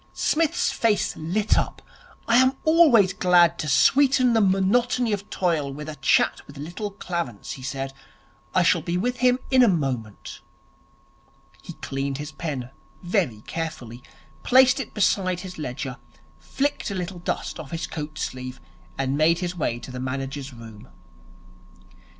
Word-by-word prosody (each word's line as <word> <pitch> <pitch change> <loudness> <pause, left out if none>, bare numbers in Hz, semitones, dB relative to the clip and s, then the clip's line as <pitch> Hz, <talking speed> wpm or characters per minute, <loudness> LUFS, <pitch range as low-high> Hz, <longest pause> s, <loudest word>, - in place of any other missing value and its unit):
Psmith's 320 -1 +1
face 220 -3 +1
lit 190 +7 0
up. - - -3 0.5
'I 230 +1 +4
am 260 +1 +5
always 290 - +5
glad 175 -3 +4
to 155 - -3
sweeten 255 - +4
the 225 - +4
monotony 215 +5 +2
of 205 0 -4
toil 160 -6 0
with 150 +2 -8
a 155 - -5
chat - - +2
with 145 - -12
Little 175 +9 -5
Clarence,' 175 -4 -5
he 130 - -7
said. 135 +1 -4 0.6
'I - - +5
shall - - +3
be 170 +1 -2
with 245 +7 -1
him 250 0 +3
in 260 -1 +6
a 245 - +6
moment.' 130 - -2 1.2
He - - -9
cleaned 135 0 -4
his 150 +1 -6
pen 140 -7 -5 0.3
very 175 - 0
carefully, 130 -6 -6 0.4
placed 255 - +5
it 260 - -6
beside 185 -3 +1
his 185 -3 -9
ledger, 130 -2 -5 0.4
flicked 285 -2 -2
a 200 - -4
little 180 0 -4
dust 175 - -4
off 150 -4 -8
his 165 0 -3
coatsleeve, 150 -5 -6 0.4
and 135 0 -1
made 160 +3 +3
his 180 0 -3
way 135 -8 -1
to 125 - -9
the 125 - -6
manager's 135 +2 -4
room. 115 -3 -12
170 Hz, 150 wpm, -24 LUFS, 135-210 Hz, 1.2 s, in